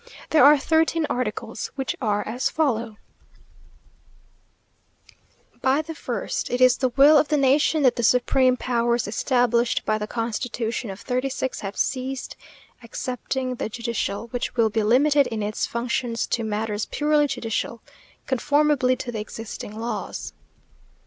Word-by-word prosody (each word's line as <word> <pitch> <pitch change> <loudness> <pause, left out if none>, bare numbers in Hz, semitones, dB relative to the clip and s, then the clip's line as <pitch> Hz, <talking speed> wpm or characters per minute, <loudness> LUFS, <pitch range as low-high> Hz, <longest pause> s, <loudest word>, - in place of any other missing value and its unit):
There 310 -4 +6
are 295 +2 +8
thirteen 320 +2 +1
articles, 225 -2 -3
which 270 -2 -2
are 210 -3 0
as 245 +4 -1
follow: 235 -8 -1 2.6
By 270 +4 +2
the 325 +1 -7
first 250 -5 -4
It 245 - -1
is 255 -1 +5
the 255 - +1
will 280 +4 +6
of 295 - +1
the 300 - +1
nation 285 +3 +3
that 255 - +4
the - - 0
supreme 250 +2 +3
powers 235 -2 0
established 240 +1 +1
by 215 0 +1
the 210 - -4
constitution 230 0 -3
of 195 0 -7
'36 260 +1 -2
have 195 0 -6
ceased, 260 0 -2 0.5
excepting 255 +2 -4
the 235 - -4
judicial, 235 -2 -3
which 245 0 -4
will 225 -3 +2
be 220 - +1
limited 280 +6 +4
in 220 -2 -3
its 210 +1 -2
functions 235 0 -2
to 235 - -2
matters 210 -1 -2
purely 295 0 +2
judicial, 230 -2 -3 0.4
conformably 285 0 +2
to 250 -1 -6
the 220 - -4
existing 215 0 -7
laws. 235 +1 -5
245 Hz, 140 wpm, -24 LUFS, 225-270 Hz, 2.6 s, are